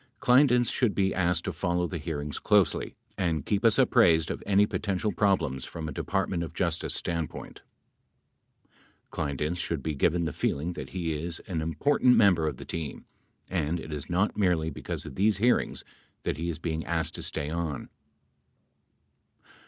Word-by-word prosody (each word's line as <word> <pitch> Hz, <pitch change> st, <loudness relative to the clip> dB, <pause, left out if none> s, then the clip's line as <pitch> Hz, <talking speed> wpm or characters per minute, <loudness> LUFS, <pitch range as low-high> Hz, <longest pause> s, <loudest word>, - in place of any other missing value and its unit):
Kleindienst 125 Hz, -2 st, +4 dB
should 120 Hz, -6 st, +1 dB
be 95 Hz, -1 st, +2 dB
asked 90 Hz, -2 st, +1 dB
to 95 Hz, -, -2 dB
follow 90 Hz, +2 st, 0 dB
the 85 Hz, -1 st, -4 dB
hearings 75 Hz, -2 st, -4 dB
closely -, -, +2 dB, 0.2 s
and 80 Hz, -6 st, 0 dB
keep 105 Hz, -1 st, 0 dB
us 115 Hz, -2 st, +4 dB
apprised 100 Hz, -, +4 dB
of -, -, -5 dB
any 100 Hz, +1 st, +5 dB
potential 105 Hz, 0 st, -1 dB
problems 95 Hz, -12 st, +1 dB
from 80 Hz, -1 st, -6 dB
a -, -, -4 dB
De -, -, -4 dB
partment 85 Hz, -3 st, -1 dB
of 85 Hz, 0 st, -7 dB
Justice 85 Hz, -3 st, 0 dB
standpoint. 85 Hz, -2 st, -4 dB, 1.5 s
Kleindienst 75 Hz, +4 st, -2 dB
should 80 Hz, -5 st, -3 dB
be 80 Hz, -, -1 dB
given 85 Hz, +4 st, +1 dB
the 80 Hz, -, -2 dB
feeling 80 Hz, +5 st, -1 dB
that -, -, -7 dB
he 85 Hz, -3 st, -2 dB
is 80 Hz, +2 st, -4 dB
an 85 Hz, -4 st, -3 dB
im 80 Hz, 0 st, -3 dB
portant 130 Hz, -, +4 dB
member 90 Hz, -7 st, +4 dB
of 70 Hz, -5 st, -3 dB
the -, -, -9 dB
team 80 Hz, -4 st, -5 dB, 0.4 s
and 85 Hz, -2 st, -1 dB
it 80 Hz, -, -7 dB
is 75 Hz, -2 st, -6 dB
not 95 Hz, +4 st, +1 dB
merely 85 Hz, -6 st, +1 dB
because 70 Hz, -, -6 dB
of -, -, -8 dB
these 100 Hz, +5 st, +2 dB
hearings 120 Hz, +5 st, +1 dB, 0.4 s
that -, -, -2 dB
he 85 Hz, +2 st, -2 dB
is 80 Hz, -, -3 dB
being 80 Hz, -1 st, -3 dB
asked -, -, -1 dB
to -, -, -6 dB
stay 75 Hz, +1 st, -3 dB
on. 80 Hz, -5 st, -3 dB
85 Hz, 175 wpm, -28 LUFS, 80-95 Hz, 1.5 s, any